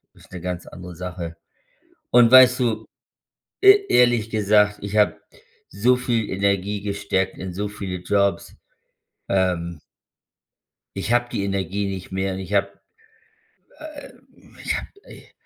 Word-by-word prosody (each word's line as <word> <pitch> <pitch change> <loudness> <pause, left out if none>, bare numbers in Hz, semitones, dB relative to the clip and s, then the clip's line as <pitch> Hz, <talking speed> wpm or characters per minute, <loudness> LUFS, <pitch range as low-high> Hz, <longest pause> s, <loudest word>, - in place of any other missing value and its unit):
ist - - -20
'ne 90 - -7
ganz 90 0 -5
andere 90 -1 -10
Sache. 85 -2 -7 0.7
Und 120 -1 +6
weißt 130 0 +8
du, 120 -3 -1 0.8
e 400 0 +7
ehrlich 120 -3 +3
gesagt, 105 -1 +2
ich 100 +1 -4
habe 105 -1 +2 0.5
so 120 +6 +2
viel 120 -4 -1
Energie 100 +1 -1
gesteckt 100 -2 -2
in 95 -1 -6
so 105 +2 -3
viele 95 -3 -6
Jobs, 100 -2 0 0.8
ähm 85 -4 -1 1.2
Ich 115 - -2
habe 120 0 +1
die 100 - -2
Energie 100 0 -2
nicht 95 -1 -6
mehr 95 0 -2
und 95 - -6
ich 95 +1 -7
habe 100 0 0 1.0
äh, 305 -2 -10 0.5
ich - - -1
habe - - -7 0.2
i - - -15
100 Hz, 135 wpm, -22 LUFS, 95-115 Hz, 1.2 s, weißt